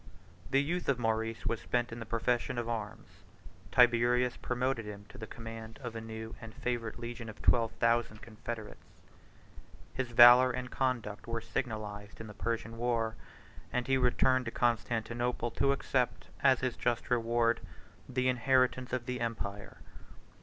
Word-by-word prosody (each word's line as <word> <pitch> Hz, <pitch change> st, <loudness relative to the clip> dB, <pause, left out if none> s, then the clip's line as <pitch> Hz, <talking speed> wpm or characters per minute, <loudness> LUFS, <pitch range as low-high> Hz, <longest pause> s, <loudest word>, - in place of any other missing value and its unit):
The 135 Hz, +1 st, +3 dB
youth 175 Hz, +3 st, -2 dB
of 135 Hz, -, +3 dB
Maurice 115 Hz, -1 st, -1 dB
was 115 Hz, 0 st, -1 dB
spent 120 Hz, -1 st, -1 dB
in 115 Hz, -, -6 dB
the 115 Hz, -, -7 dB
profession 120 Hz, +2 st, 0 dB
of 120 Hz, -1 st, -2 dB
arms: 110 Hz, -3 st, -4 dB, 0.7 s
Tiberius 120 Hz, 0 st, +4 dB
promoted 125 Hz, -1 st, -1 dB
him 105 Hz, -1 st, -8 dB
to 130 Hz, -, -12 dB
the 110 Hz, -, -6 dB
command 115 Hz, -1 st, -8 dB
of 120 Hz, -2 st, -5 dB
a 115 Hz, -, -4 dB
new 110 Hz, 0 st, -7 dB
and 115 Hz, 0 st, -10 dB
favorite 120 Hz, -3 st, -3 dB
legion 120 Hz, -1 st, -6 dB
of 105 Hz, -, -10 dB
twelve 115 Hz, -2 st, +4 dB
thousand 115 Hz, -2 st, +1 dB
confederates; 110 Hz, 0 st, -7 dB, 1.1 s
his 130 Hz, -2 st, -2 dB
valor 120 Hz, +2 st, +9 dB
and 125 Hz, 0 st, -4 dB
conduct 120 Hz, -6 st, -2 dB
were 115 Hz, 0 st, -2 dB
signalized 105 Hz, -3 st, -5 dB
in 110 Hz, -, -7 dB
the 105 Hz, -, -9 dB
Persian 115 Hz, +1 st, -3 dB
war; 115 Hz, -2 st, 0 dB, 0.6 s
and 125 Hz, -1 st, -1 dB
he 135 Hz, -, +2 dB
returned 130 Hz, 0 st, +3 dB
to 115 Hz, -, -3 dB
Constantinople 120 Hz, 0 st, 0 dB
to 140 Hz, +4 st, +2 dB
accept, 130 Hz, -2 st, -1 dB
as 135 Hz, -3 st, +4 dB
his 130 Hz, -2 st, -1 dB
just 120 Hz, 0 st, -1 dB
reward, 115 Hz, 0 st, +2 dB, 0.5 s
the 130 Hz, 0 st, 0 dB
inheritance 130 Hz, 0 st, +2 dB
of 125 Hz, -2 st, -1 dB
the 125 Hz, -1 st, -3 dB
empire. 105 Hz, -3 st, -4 dB
120 Hz, 155 wpm, -32 LUFS, 115-125 Hz, 1.1 s, valor